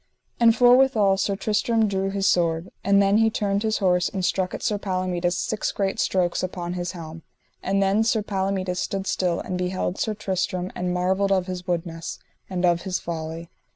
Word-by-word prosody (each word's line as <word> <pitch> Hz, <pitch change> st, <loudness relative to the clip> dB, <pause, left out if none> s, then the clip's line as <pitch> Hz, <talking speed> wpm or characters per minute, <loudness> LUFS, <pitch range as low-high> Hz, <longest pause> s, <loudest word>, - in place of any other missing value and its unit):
And 230 Hz, -1 st, +6 dB
forthwithal 245 Hz, -5 st, +5 dB
Sir 200 Hz, 0 st, 0 dB
Tristram 220 Hz, +2 st, +1 dB
drew 195 Hz, -1 st, -1 dB
his 195 Hz, 0 st, -2 dB
sword. 165 Hz, -1 st, +1 dB
And 200 Hz, 0 st, +4 dB
then 200 Hz, +1 st, +3 dB
he 225 Hz, 0 st, +4 dB
turned 200 Hz, -2 st, -1 dB
his 220 Hz, 0 st, 0 dB
horse 180 Hz, -2 st, +2 dB
and 190 Hz, -3 st, -2 dB
struck 185 Hz, +1 st, 0 dB
at -, -, -2 dB
Palomides 185 Hz, -2 st, -1 dB
six 210 Hz, +4 st, -1 dB
great 195 Hz, -1 st, -2 dB
strokes 180 Hz, -2 st, +1 dB
upon 175 Hz, -1 st, -4 dB
his 175 Hz, -1 st, -3 dB
helm; 165 Hz, -2 st, -8 dB, 0.4 s
and 195 Hz, +1 st, +1 dB
then 195 Hz, +3 st, +2 dB
Sir 225 Hz, -1 st, +1 dB
Palomides 190 Hz, -2 st, -2 dB
stood 195 Hz, 0 st, -2 dB
still, 180 Hz, -3 st, 0 dB
and 180 Hz, -, -4 dB
beheld 180 Hz, +1 st, -2 dB
Sir 215 Hz, -2 st, -1 dB
Tristram, 185 Hz, -2 st, -2 dB
and 180 Hz, 0 st, -2 dB
marvelled 190 Hz, +2 st, +1 dB
of 190 Hz, -2 st, +2 dB
his 180 Hz, -1 st, -6 dB
woodness, 165 Hz, -1 st, -3 dB, 0.3 s
and 180 Hz, -1 st, 0 dB
of 170 Hz, -1 st, +2 dB
his 185 Hz, -1 st, -2 dB
folly. 165 Hz, 0 st, -6 dB
190 Hz, 185 wpm, -24 LUFS, 180-200 Hz, 0.4 s, And